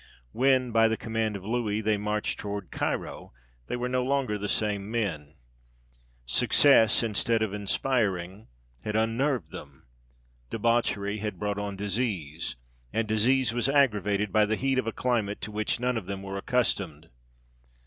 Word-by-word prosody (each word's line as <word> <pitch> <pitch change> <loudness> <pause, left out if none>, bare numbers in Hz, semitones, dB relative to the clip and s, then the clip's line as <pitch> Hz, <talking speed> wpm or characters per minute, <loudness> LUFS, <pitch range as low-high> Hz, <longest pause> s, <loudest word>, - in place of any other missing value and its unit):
When, 130 -1 +2
by 115 0 +5
the 110 0 0
command 110 -2 -2
of 95 -1 -7
Louis, 110 -2 -1
they 110 0 +1
marched 105 +1 -2
towards 100 -3 -5
Cairo, - - -3 0.3
they - - -2
were 125 0 -2
no 125 0 0
longer 135 -4 0
the 105 0 -3
same 105 -1 -1
men; 85 -11 -3 0.9
success, 115 - +5
instead 115 +1 +1
of 105 -2 -2
inspiring, 100 -2 -1 0.4
had 105 - -3
unnerved 115 - 0
them; - - -11 0.6
debauchery 110 -2 0
had 105 -3 -4
brought 105 +2 -2
on 100 -1 -4
disease, 95 - -2 0.4
and 115 -1 -1
disease 115 +3 +3
was 120 +2 0
aggravated 105 -7 +2
by 105 -1 +4
the 110 - +1
heat 135 +2 +1
of 130 - -2
a - - 0
climate 110 -4 -1
to 105 +3 -5
which 105 +2 -1
none 125 0 0
of 100 -5 -5
them 100 -1 -5
were 95 0 -5
accustomed. 125 +5 -1
110 Hz, 155 wpm, -27 LUFS, 100-120 Hz, 0.9 s, by